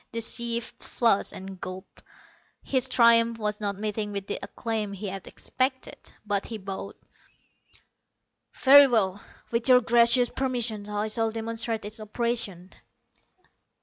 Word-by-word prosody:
The 230 - -2
chief 235 0 0
flushed, 230 -5 +1
and 190 -1 -9
gulped. 185 +1 -9 0.6
His 260 -1 -1
triumph 230 -2 +4
was 210 -1 -3
not 200 -2 -2
meeting 210 0 -3
with 200 -1 -5
the 200 - -4
acclaim 215 0 -4
he 200 +1 -5
had 195 -1 -7
expected. 260 0 -3
But 205 -1 -1
he 225 - -5
bowed. 195 0 -7 1.6
"Very 280 +1 +8
well. 205 -5 0 0.3
With 230 +2 +1
your 250 -1 +7
gracious 235 +1 +4
permission 235 -6 -2
I 210 +1 -2
shall 225 +1 0
demonstrate 225 0 -4
its 215 +2 -6
operation." 215 -4 -3
220 Hz, 130 wpm, -26 LUFS, 205-235 Hz, 1.6 s, Very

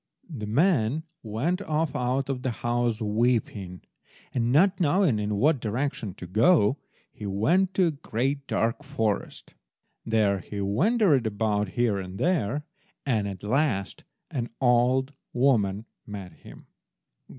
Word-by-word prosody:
The 105 -4 -5
man 145 - +2 0.2
went 130 - -1
off 155 -4 -1
out 130 +2 0
of 135 -2 -3
the 130 - -1
house, 120 -1 -1
weeping; 105 -4 0 0.5
and, 120 -1 +1
not 185 +8 +4
knowing 170 - +3
in 105 0 -1
what 145 +7 +3
direction 115 -3 -3
to 90 - -8
go, 115 - +3 0.3
he 105 - -7
went 175 - +1
to 185 - +4
a 165 - +2
great 135 0 -2
dark 115 +6 0
forest. 110 -8 -3 0.5
There 105 -3 +2
he 100 +3 -7
wandered 140 - +2
about, 105 0 0
here 115 -5 +2
and 95 0 -7
there. 150 - 0 0.4
At 100 -8 -1
last 110 -4 0 0.3
an 120 -3 -3
old 130 +2 +3 0.2
woman 110 -6 +2 0.2
met 100 -4 -7
him. - - -14
120 Hz, 130 wpm, -26 LUFS, 105-145 Hz, 0.5 s, not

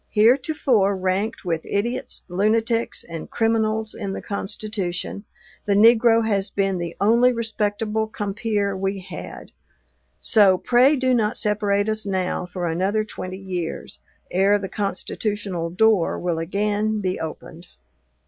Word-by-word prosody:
Heretofore 235 -2 +3
ranked 190 +3 -1
with 165 -2 -1
idiots, 235 +5 -2
lunatics, 225 +5 0
and 165 -2 -8
criminals 220 -1 0
in 200 -3 -5
the - - -5
Constitution, 200 -1 -4 0.4
the 200 - +3
negro 230 +1 +5
has 200 -2 0
been 195 -2 0
the 170 -1 -5
only 235 +5 +4
respectable 220 -1 -1
compeer 205 -1 -2
we 195 +1 -2
had; - - -9 0.7
so 195 -4 +5
pray 250 +8 +4
do 260 -2 +1
not 220 -3 +1
separate 205 -1 +1
us 215 0 0
now 185 -2 -2
for 180 0 -4
another 190 +6 0
twenty 185 -3 -7
years, 180 -4 -5 0.3
ere 195 +3 +3
the 195 -1 -5
constitutional 200 -2 -3
door 200 0 +2
will 175 -2 -2
again 210 +5 -1
be 185 -2 -2
opened." 160 -1 -8
205 Hz, 130 wpm, -23 LUFS, 190-220 Hz, 0.7 s, negro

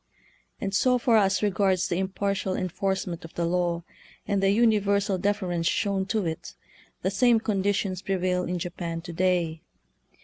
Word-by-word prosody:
And 195 -1 -3
so 250 +5 +3
far 235 -2 +3
as 195 -1 +2
re 205 - +3
gards 190 -1 +2
the 175 - -1
impartial 190 0 -1
enforcement 185 -1 -2
of 165 - -11
the 170 - 0
law, 175 0 0 0.4
and 200 -1 +1
the 195 - +3
universal 200 -3 +2
deference 180 -4 0
shown 195 -2 0
to 215 -2 0
it, 160 -1 -5 0.5
the 190 - +1
same 235 +3 +4
conditions 200 -3 -1
prevail 185 -1 0
in 180 +1 -2
Japan 170 -1 -4
to 170 0 -8
day. 170 -2 0
190 Hz, 160 wpm, -26 LUFS, 175-200 Hz, 0.5 s, same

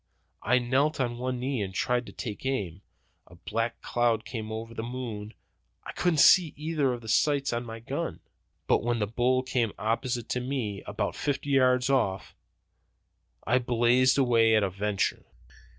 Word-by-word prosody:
I 125 +3 +3
knelt 135 +5 +1
on 120 -2 -1
one 125 0 -2
knee 130 -2 -2
and 95 -2 -4
tried 125 +3 0
to - - -9
take 105 -5 -6
aim. 100 -10 -2 0.5
A 90 - -16
black 115 +6 -3
cloud 115 -2 +1
came 110 -3 -6
over 115 +1 -6
the 115 - -4
moon. 115 -3 -6 0.5
I - - -7
couldn't 175 -3 0
see 175 -5 +6
either 150 -3 0
of 120 -1 -4
the 110 - -11
sights 140 +3 +2
on 120 0 -3
the 115 0 -7
gun. 115 - -4 0.5
But - - +2
when 120 0 0
the 105 - 0
bull 125 +4 +1
came 120 -4 -1
opposite 115 +3 -2
to 125 - 0
me, 125 -6 -3
about - - -2
fifty 145 0 -2
yards 130 -1 +3
off, 115 -9 0 1.1
I 125 +4 +3
blazed 125 +2 +3
away 115 -4 +4
at 110 - +3
a 95 - -1
venture. 100 +1 -1
120 Hz, 170 wpm, -28 LUFS, 110-130 Hz, 1.1 s, see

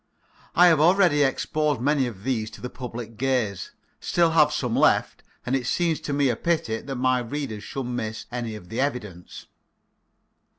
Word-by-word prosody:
I 180 - +7
have 165 -4 +5
already 175 -2 +4
exposed 150 +1 0
many 140 +1 +1
of 100 -5 -9
these 115 -5 -1
to - - -15
the 125 - -6
public 120 -3 -7
gaze, 125 -7 -1 0.3
still 170 -1 +2
have 150 -2 +4
some 125 -5 -1
left, - - +2 0.2
and 125 - 0
it 125 -3 -2
seems 170 -3 0
to - - -4
me 140 -1 +2
a 120 - +1
pity 115 -8 -1
that 135 -1 -6
my 130 0 +2
readers 120 -4 -5
should 135 - -5
miss 110 -3 -4
any 120 -2 -4
of 90 -4 -11
the 115 +4 -2
evidence. 105 -11 -5
130 Hz, 175 wpm, -25 LUFS, 115-150 Hz, 0.3 s, I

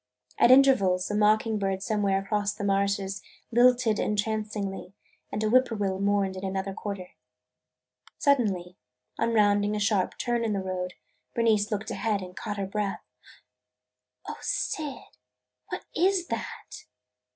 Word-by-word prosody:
At - - +6
intervals 210 -9 +5
a - - -1
mocking 215 +1 +3
bird 195 -1 -1
somewhere 205 -3 +1
across 205 +1 -1
the 205 - -6
marshes 200 0 0 0.3
lilted 240 -2 +4
entrancingly 210 -2 -2 0.4
and 215 - -2
a - - +2
whippoorwill 215 -5 +2
mourned 200 -1 +1
in 185 - -7
another 195 0 -2
quarter. 195 -3 -6 1.1
Suddenly, 195 -10 +1 0.4
on 230 0 +1
rounding 205 0 +3
a - - -1
sharp 205 -2 +1
turn 240 -1 -1
in 220 -2 0
the 200 - -1
road, 180 -1 -4 0.4
Bernice 220 -3 +2
looked 210 +1 -3
ahead 210 -4 -1
and 180 0 -10
caught 210 -2 -5
her 200 - -2
breath. 200 0 -3 1.2
"O - - -5
Syd, 285 - -3 0.5
what - - -6
is 370 +1 +2
that?" - - -6
205 Hz, 135 wpm, -27 LUFS, 195-220 Hz, 1.2 s, At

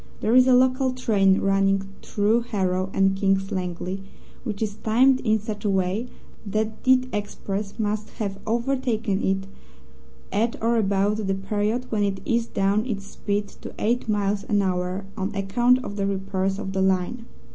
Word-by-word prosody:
There 220 - +1
is 255 0 +7
a 255 - +6
local 260 +1 +3
train 200 -6 +3
running 195 0 +2 0.2
through 215 +3 +1
Harrow 185 -3 0
and 195 0 +2
King's 195 -1 +1
Langley, 185 +1 -3 0.4
which 220 -3 -3
is 210 -1 -3
timed 255 +4 +4
in 220 -3 +2
such 210 0 -6
a 210 - +1
way 190 +4 0 0.4
that 215 +1 -2
the 255 0 +4
express 205 0 -4
must 215 -1 -2
have 200 -4 -3
overtaken 230 -3 0
it 195 0 0 0.9
at 225 +3 +1
or 230 +1 +2
about 205 0 +1
the 195 - +1
period 210 +5 -1
when 215 -2 +1
it 200 -1 0
eased 235 0 -1
down 200 +2 +2
its 200 -5 -3
speed 205 0 -3
to - - -9
eight 235 +1 0
miles 205 -1 0
an 205 -1 +2
hour 185 +1 -1
on 195 -1 -3
account 240 +6 +2
of 205 - -6
the 195 -1 0
repairs 195 0 -1
of 195 -2 -5
the 190 - 0
line. 190 +5 0
205 Hz, 170 wpm, -24 LUFS, 195-225 Hz, 0.9 s, is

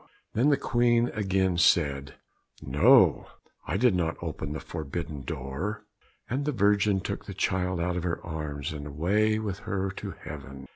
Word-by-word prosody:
Then 125 +7 +3
the 145 - +4
Queen 120 -1 +2
again 95 -4 0
said, 70 -4 +2 0.4
"No, 70 +3 +5 0.4
I 80 - 0
did 125 0 +4
not 85 -2 0
open 80 -3 -5
the 80 - -4
forbidden 80 -1 -5
door;" 75 - -4 0.4
and 135 +4 -1
the 150 - 0
Virgin 100 -4 +3
took - - -4
the - - -7
child 90 -1 0
out 90 +1 0
of 90 - -1
her 85 -1 -2
arms, 75 -3 -4
and 75 -1 -6
away 100 +9 +1
with 105 -3 -3
her 95 -1 -2
to 100 -3 -6
heaven. 70 -3 -8
90 Hz, 160 wpm, -28 LUFS, 75-105 Hz, 0.4 s, No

